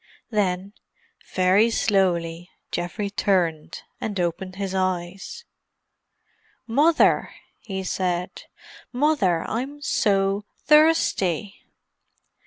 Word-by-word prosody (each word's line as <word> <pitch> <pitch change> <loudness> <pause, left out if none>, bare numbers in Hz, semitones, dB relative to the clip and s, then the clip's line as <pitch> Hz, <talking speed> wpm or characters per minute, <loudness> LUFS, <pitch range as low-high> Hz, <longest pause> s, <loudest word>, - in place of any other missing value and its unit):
Then, 195 -2 -1 0.6
very 190 +5 +4
slowly, 175 -6 0 0.2
Geoffrey 175 +4 -3
turned, 175 -6 0 0.2
and 205 -3 -3
opened 180 +2 -2
his 195 -1 -4
eyes. 185 - -3 1.2
"Mother!" 295 +8 +3 0.2
he 190 -3 -5
said. 180 -1 -2 0.5
"Mother, 245 - +1
I'm 270 +6 -4
so 195 -3 +1 0.2
thirsty!" 295 - +2
195 Hz, 75 wpm, -24 LUFS, 180-220 Hz, 1.2 s, very